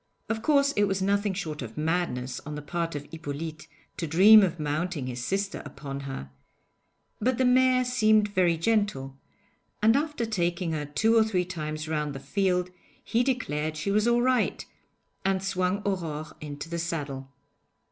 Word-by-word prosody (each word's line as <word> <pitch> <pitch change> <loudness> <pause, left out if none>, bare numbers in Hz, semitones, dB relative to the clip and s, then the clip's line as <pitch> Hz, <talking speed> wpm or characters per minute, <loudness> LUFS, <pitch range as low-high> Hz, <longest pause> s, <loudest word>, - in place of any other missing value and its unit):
Of 225 0 -1
course 280 +2 +3
it 205 - +4
was 195 -1 -1
nothing 200 +1 +1
short 155 -6 -4
of 115 -3 -8
madness 150 -6 -1
on 150 0 -7
the 150 - -6
part 165 +1 -3
of 145 0 -5
Hippolyte 155 0 -6 0.3
to 165 - -2
dream 200 +8 +8
of 175 -4 0
mounting 150 0 -2
his 125 -1 -4
sister 195 +7 -2
upon 140 -1 -7
her, 135 - -7 0.9
but 250 +2 +1
the 260 - +2
mare 255 0 +4
seemed 215 -4 +3
very 180 -4 +2
gentle, 170 -9 0 0.6
and 220 +2 +4
after 295 -4 0
taking 175 -5 -1
her 150 -2 -3
two 185 +11 +2
or 225 - +6
three 190 -5 0
times 155 -3 -5
round 150 -2 -2
the - - -5
field 180 +5 0 0.3
he 235 - +1
declared 155 - -1
she 165 +6 -1
was 215 +3 +2
all 240 0 +3
right, 255 -1 +1 0.6
and 190 0 0
swung 190 +1 0
Aurore 160 -6 -3
into 145 0 -6
the 170 0 -4
saddle. 145 -5 -4
175 Hz, 165 wpm, -27 LUFS, 150-210 Hz, 0.9 s, dream